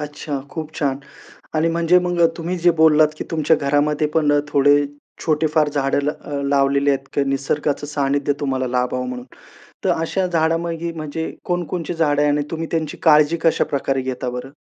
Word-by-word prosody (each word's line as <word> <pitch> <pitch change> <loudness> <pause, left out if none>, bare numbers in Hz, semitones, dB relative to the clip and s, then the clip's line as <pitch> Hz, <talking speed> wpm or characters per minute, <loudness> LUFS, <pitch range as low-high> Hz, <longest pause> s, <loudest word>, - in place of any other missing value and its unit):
अच्छा, 145 -1 -5
खूप 155 0 -6
छान 140 -2 0 0.6
आणि 155 +2 +2
म्हणजे 170 +2 +3
मग 175 -1 -1
अ, 165 - +7
तुम्ही 175 +2 -3
जे 175 +1 +4
बोललात 155 -1 +6
की - - -4
तुमच्या 160 -1 +2
घरामध्ये 145 +2 +1
पण 150 -2 +3
अ, 145 - +3
थोडे 145 +1 +4 0.5
छोटे 155 0 +1
फार 155 -2 +3
झाडं 140 -1 0
लाव 145 -1 -4
अ, - - -4
लावलेले 140 0 +2
आहेत 135 0 -2
किंवा 140 -1 0
निसर्गाचं 145 +1 -1
सानिध्य 145 -1 0
तुम्हाला 130 -2 -1
लाभावं 125 0 -1
म्हणून. 125 -1 -6 0.6
तर - - +3
अशा 185 +3 -1
झाडामागी 165 0 -1
म्हणजे 160 0 -5
कोणकोणची 175 -1 -3
झाडं 145 -3 +2
आहे 150 - +3
आणि 145 0 +1
तुम्ही 165 0 -3
त्यांची 160 -3 -2
काळजी 150 +1 +5
कशाप्रकारे 135 -4 +1
घेता 130 -1 -3
बरं? 125 +2 -6
150 Hz, 175 wpm, -20 LUFS, 140-165 Hz, 0.6 s, अ